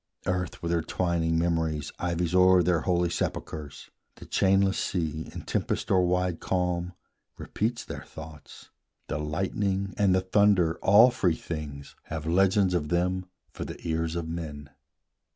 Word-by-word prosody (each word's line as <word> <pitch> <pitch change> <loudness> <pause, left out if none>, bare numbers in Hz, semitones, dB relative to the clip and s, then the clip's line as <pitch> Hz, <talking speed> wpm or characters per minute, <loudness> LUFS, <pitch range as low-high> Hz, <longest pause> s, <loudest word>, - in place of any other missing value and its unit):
Earth 90 -2 -2
with 85 - -1
her 85 -1 +2
twining 85 -1 0
memories 80 -3 0
ivies 85 -1 -1
o'er 90 -1 +6
Their 90 -2 +2
holy 90 0 +1
sepulchres; 75 -3 -4 0.2
the - - -12
chainless 95 0 +2
sea, 80 -3 -2
In - - -7
tempest - - -2
or 90 -1 +4
wide 90 -1 0
calm, 90 -1 -1 0.4
repeats 115 +3 -2
their - - -6
thoughts; 80 -2 -12 0.4
The - - -2
lightning 95 +5 -1
and 100 -3 +4
the 95 - +2
thunder, 95 -3 +3
all 110 +6 +7
free 95 -9 +1
things, 75 -4 -7
Have 80 -1 -5
legends 95 +3 +3
of 75 -4 -1
them 90 +2 0 0.2
for - - -6
the - - -7
ears 80 0 -1
of 85 -1 -3
men. 75 -4 -6
85 Hz, 150 wpm, -27 LUFS, 80-95 Hz, 0.4 s, all